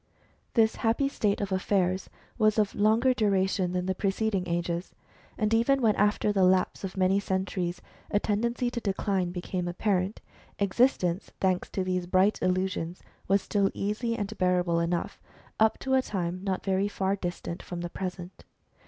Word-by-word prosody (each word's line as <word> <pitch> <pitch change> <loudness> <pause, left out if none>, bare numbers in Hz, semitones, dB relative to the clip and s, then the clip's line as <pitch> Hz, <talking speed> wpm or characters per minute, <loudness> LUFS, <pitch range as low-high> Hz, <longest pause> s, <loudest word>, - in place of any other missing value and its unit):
This 225 -2 +3
happy 230 +5 +1
state 210 -7 0
of 200 -1 -3
affairs 185 -1 0 0.3
was 215 -1 +3
of 210 -2 +2
longer 225 +5 +3
duration 190 -5 +1
than 180 0 -1
the 190 - 0
preceding 195 0 -1
ages. 170 +1 -2 0.4
And 215 0 +1
even 235 +5 +3
when 220 -5 +3
after 210 0 +2
the 195 -2 +3
lapse 185 +1 +2
of 195 0 -5
many 190 +1 +3
centuries, 190 -2 -2 0.3
a 205 - +2
tendency 235 +4 0
to 240 - -4
decline 195 -3 0
became 180 0 -3
apparent, 185 +2 0 0.4
existence, 200 -3 +1
thanks 185 -1 +1
to 190 - -2
these 180 -1 -1
bright 185 +3 +3
illusions, 185 -1 -1 0.2
was 195 +1 +3
still 200 -2 +1
easy 220 +3 -1
and 205 -3 -4
bearable 180 -2 +2
enough, 170 +1 -2 0.4
up 220 0 +4
to 265 - -1
a 260 - +5
time 185 -5 -3
not 190 -2 -2
very 195 +1 +1
far 195 -1 -1
distant 175 -2 -5
from 175 -1 -6
the 175 - -4
present. 180 -1 -6
195 Hz, 160 wpm, -28 LUFS, 180-210 Hz, 0.4 s, a